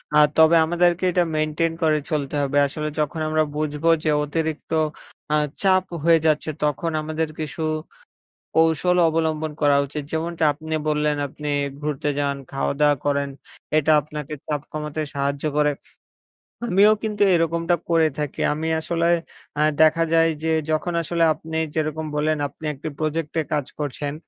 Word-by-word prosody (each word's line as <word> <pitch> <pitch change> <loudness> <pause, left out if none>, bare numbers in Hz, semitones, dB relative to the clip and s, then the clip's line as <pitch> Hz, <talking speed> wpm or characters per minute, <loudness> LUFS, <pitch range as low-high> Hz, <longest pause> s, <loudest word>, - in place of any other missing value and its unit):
আ - - +6 0.2
তবে 160 +1 +6
আমাদেরকে 175 +2 +2
এটা 175 0 +3
মেইনটেইন 155 +2 0
করে 155 -1 +3
চলতে 145 -1 -1
হবে। 140 0 0
আসলে 155 +2 -4
যখন 150 +2 -1
আমরা 155 0 +2
বুঝবো 150 +1 -1
যে, 155 - +1
অতিরিক্ত 160 +1 -3 0.6
আ - - +5 0.3
চাপ 185 -1 +4 0.2
হয়ে 165 0 +5
যাচ্ছে, 155 0 +2
তখন 150 +3 0
আমাদের 155 +1 -2
কিছু 155 +1 -5 1.0
কৌশল 165 +2 +3
অবলম্বন 160 -1 -1
করা 145 -1 +5
উচিত। 150 +2 -5
যেমনটা 165 0 -1
আপনি 160 +2 -6
বললেন 150 0 +1
আপনি 150 +2 -7 0.3
ঘুরতে 150 -1 -2
যান, 140 -1 0 0.2
খাওয়া-দাওয়া 145 +1 +2
করেন। 140 -1 +1 0.5
এটা 155 +1 +3
আপনাকে 150 0 -7
চাপ 150 -2 -1
কমাতে 150 0 -4
সাহায্য 140 +1 -2
করে। 150 0 +3 1.0
আমিও 205 0 +5
কিন্তু 210 -2 0
এরকমটা 165 +1 +1
করে 165 -2 +4
থাকি। 150 -2 -3
আমি 155 +2 -3
আসলে 170 +1 -1 0.5
আ - - +3 0.2
দেখা 160 +1 +5
যায় 165 0 +5
যে, 160 - +1 0.2
যখন 165 +3 -1
আসলে 170 +1 0
আপনি 160 +1 -6 0.2
যেরকম 155 0 -1
বললেন 155 +1 +1
আপনি 145 +3 -12
একটি 145 +3 -6
প্রজেক্টে 155 +1 -1
কাজ 145 -3 0
করছেন, 145 0 -3
155 Hz, 150 wpm, -23 LUFS, 150-165 Hz, 1.0 s, আ